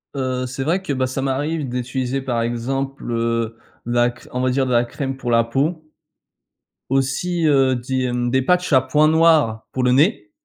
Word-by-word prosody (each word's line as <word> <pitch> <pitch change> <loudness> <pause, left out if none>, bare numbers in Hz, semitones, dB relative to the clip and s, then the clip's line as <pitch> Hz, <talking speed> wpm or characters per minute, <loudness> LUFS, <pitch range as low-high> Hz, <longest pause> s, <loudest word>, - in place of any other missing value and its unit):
Heu, 130 -1 -2
c'est 135 +1 -4
vrai 170 +7 0
que, 165 -7 -3
bah, 130 -1 0
ça 130 +1 -3
m'arrive 145 +3 -1
d'utiliser, 125 +2 -2
par 120 -3 -1
exemple, 135 +4 -3
heu, 115 -1 -1 0.3
de 120 - -4
la 120 0 +3
cr 120 - -13
on 125 - -1
va 130 - +1
dire 130 +1 +1
de 125 - -3
la 120 0 +3
crème 135 +2 -5
pour 125 -2 -3
la 115 0 +4
peau, 155 +7 -2 1.0
aussi, 140 +6 0
heu, 135 -3 +3
des, 130 +1 -2
hem, 120 -1 -1
des 130 +1 +2
patchs 180 +3 +1
à 130 - +7
points 150 +4 +2
noirs 155 -9 +3
pour 130 - -2
le 125 0 +3
nez 175 - +2
130 Hz, 200 wpm, -20 LUFS, 120-140 Hz, 1.0 s, à